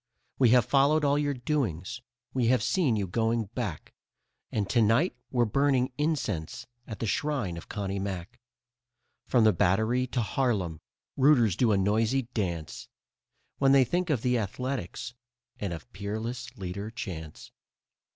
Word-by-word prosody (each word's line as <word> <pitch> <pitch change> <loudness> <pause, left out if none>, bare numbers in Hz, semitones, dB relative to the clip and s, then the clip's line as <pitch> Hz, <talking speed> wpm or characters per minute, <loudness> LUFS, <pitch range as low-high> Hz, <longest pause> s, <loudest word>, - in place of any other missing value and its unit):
We 125 -3 +6
have 125 -1 +5
followed 145 +2 +3
all 145 +1 +3
your 145 -1 0
doings, 120 - -2 0.3
we 125 -3 +1
have 125 -2 +3
seen 130 - +2
you 100 -2 0
going 115 +2 0
back, 105 - -4 0.6
And 105 -3 -1
to 115 +4 +2
night 115 - +3
we're 120 -2 +2
burning 130 +2 +1
incense 125 - -2 0.2
at 110 - -6
the - - -3
shrine 120 - -1
of 85 - -10
Connie 100 -2 -3
Mack. 95 +4 -5 0.9
From 120 -3 +4
the 110 -1 +5
Battery 110 +8 +2
to 125 0 -1
Harlem, 105 - -1 0.4
rooters 130 - +5
do 115 +1 +3
a 100 - +3
noisy 110 +7 +2
dance 85 -8 -3 0.7
When 135 -1 +5
they 135 -1 +7
think 175 +7 -1
of 135 -7 0
the 125 -1 +2
Athletics 120 0 -4 0.5
and 100 -3 -3
of 80 -4 -7
Peerless 115 +5 -5
Leader 100 +2 -5
Chance. 90 -10 -7
115 Hz, 150 wpm, -28 LUFS, 100-130 Hz, 0.9 s, they